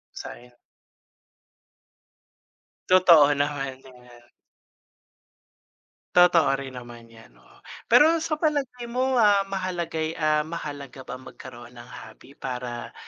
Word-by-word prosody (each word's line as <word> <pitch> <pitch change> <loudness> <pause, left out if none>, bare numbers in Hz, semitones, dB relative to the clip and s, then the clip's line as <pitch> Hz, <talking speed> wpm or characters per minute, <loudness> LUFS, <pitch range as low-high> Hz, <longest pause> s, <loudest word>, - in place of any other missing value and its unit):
Sayang. 125 0 -10 2.4
Totoo 170 -6 +6
naman, 140 -2 -2
yan. 125 -2 -18 1.9
Totoo 175 -5 +5
rin 130 -2 -9
naman 120 -1 -12
yan, 115 - -18
oo. - - -23 0.3
Pero 315 +7 +5
sa 310 -2 -2
palagay 275 -6 -2
mo, 255 +2 -1
ah, 205 -3 +4
mahalagay, 170 -4 -3
ah, 155 -1 0
mahalaga 145 -5 -8
ba 130 - -8
magkaroon 125 -2 -13
ng 120 0 -13
hobby 140 - -14
para 125 -2 -6
145 Hz, 100 wpm, -24 LUFS, 125-185 Hz, 2.4 s, Totoo